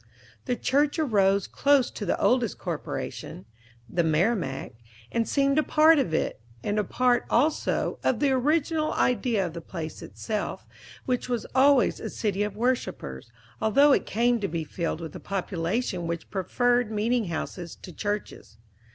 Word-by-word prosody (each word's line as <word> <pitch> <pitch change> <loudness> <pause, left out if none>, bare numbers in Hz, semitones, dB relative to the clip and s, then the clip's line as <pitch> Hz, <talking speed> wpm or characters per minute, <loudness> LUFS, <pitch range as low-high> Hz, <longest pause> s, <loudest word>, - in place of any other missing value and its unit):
The 250 - 0
church 285 +5 +1
arose 200 - +2
close 280 -2 +2
to 205 - -6
the - - 0
oldest 245 -4 +2
corporation 95 - -5 0.4
(the 170 - 0
"Merrimack"), 160 - 0 0.4
and 230 -1 0
seemed 275 +1 +2
a - - +5
part 310 +1 +5
of 255 -11 0
it, 160 - -1 0.2
and 205 +1 0
a - - +2
part, 245 +4 +2
also, 295 +6 +1
of 240 - +1
the 285 -2 +2
original 310 +4 +1
idea 240 -5 +1
of 170 - -5
the 170 - -6
place 160 -2 -7
itself, 215 -2 -4 0.4
which 250 -1 -1
was 240 -2 -1
always 270 0 +4
a - - -5
city 205 -2 -2
of 210 -1 -2
worshipers, 165 - -2 0.3
although 280 +7 +5
it - - +2
came 240 +2 +2
to 200 - -1
be 165 -2 -3
filled 165 +1 -3
with 160 -3 -7
a - - -6
population 185 0 -2
which 170 0 -5
preferred 245 +5 +1
meeting 225 +2 +1
houses 170 0 -5
to 180 - -11
churches. 205 - -5
220 Hz, 160 wpm, -26 LUFS, 180-255 Hz, 0.4 s, a